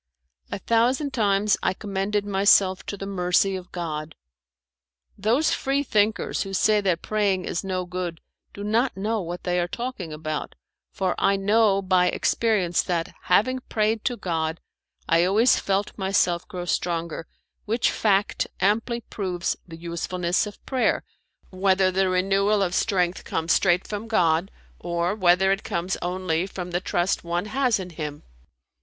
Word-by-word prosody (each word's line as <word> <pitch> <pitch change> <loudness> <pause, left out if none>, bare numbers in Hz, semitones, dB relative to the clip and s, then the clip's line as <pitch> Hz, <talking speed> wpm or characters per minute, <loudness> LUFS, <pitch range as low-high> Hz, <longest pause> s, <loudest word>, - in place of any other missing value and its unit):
A - - -2
thousand 245 +7 +1
times 205 -3 +2
I 185 - 0
commended 200 0 -2
myself 195 -1 +4
to 200 - -4
the 195 - -6
mercy 190 0 +1
of 185 -1 -8
God. 155 -3 -5 1.0
Those 235 +10 +2
Free 275 +1 0
thinkers 215 -4 +1
who 195 0 -3
say 210 +2 +3
that 185 -4 0
praying 200 -4 0
is 170 - -2
no 185 -1 -2
good 175 -2 -4 0.3
do 200 - -8
not 225 +3 +1
know 215 +2 -1
what 175 0 -6
they 180 -1 0
are 175 - 0
talking 235 -6 -5
about; 155 0 -4 0.4
for 185 -2 -1
I 200 - +3
know 200 0 +3
by 185 -1 +3
experience 190 -3 +1
that, 170 -2 -2
having 255 +8 +3
prayed 215 0 0
to 245 -2 0
God, 165 -4 -2 0.5
I 165 +1 +4
always 215 +7 +4
felt 200 +1 -1
myself 190 -3 +1
grow 180 -4 -6
stronger, 170 -2 -2 0.4
which 225 +3 +1
fact 200 -2 +1
amply 225 +5 +1
proves 185 -5 -3
the 165 -2 -10
usefulness 170 +2 -1
of 205 - -12
prayer, 260 -2 +1 0.5
whether 190 0 +2
the 190 0 +1
renewal 195 +3 +2
of 180 -2 -1
strength 185 -4 0
come 165 0 -3
straight 175 +1 +3
from 210 +2 -5
God, 175 -4 +2 0.3
or 170 +1 -1
whether 190 -1 +3
it 195 - 0
comes 175 +2 -2
only 180 -1 -1
from 180 -2 -6
the 175 +1 -1
trust 175 0 0
one 175 +2 -2
has 255 -1 +1
in 180 -1 -6
Him. 150 -2 -6
190 Hz, 155 wpm, -24 LUFS, 175-210 Hz, 1.0 s, myself